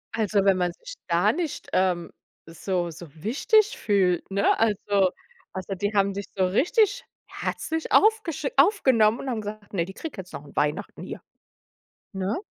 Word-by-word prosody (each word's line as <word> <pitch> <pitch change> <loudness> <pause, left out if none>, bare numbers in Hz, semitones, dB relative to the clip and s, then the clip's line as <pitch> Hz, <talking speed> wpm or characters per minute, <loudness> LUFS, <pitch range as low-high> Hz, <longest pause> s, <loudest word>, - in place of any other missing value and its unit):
Also, 205 -3 +1
wenn 195 -1 +4
man 180 -1 0
sich - - -11
da 180 +5 +3
nicht, 330 -2 -4
ähm, 180 -2 +1 0.3
so 175 +1 -3
so 170 +2 -10 0.2
wichtig 425 - +3
fühlt, 190 -4 +1
ne? 200 +1 +2
Also 205 -3 +2 0.4
also 190 +1 -5
die 205 +3 -1
haben 200 0 +3
dich 200 0 -5
so 190 -1 +2
richtig 415 - +2 0.2
herzlich 320 0 -4
aufgesch 420 -9 +3
aufgenommen 260 - +4
und 270 - -5
haben 220 - -2
gesagt: 210 0 -8
„Ne, 170 -3 0
die 190 - -9
kriegt 305 +1 -7
jetzt 185 -1 -8
noch 145 - -8
Weihnachten 150 +8 -1
hier“, - - -7 0.9
ne? 195 - -2
205 Hz, 160 wpm, -25 LUFS, 185-275 Hz, 0.9 s, wenn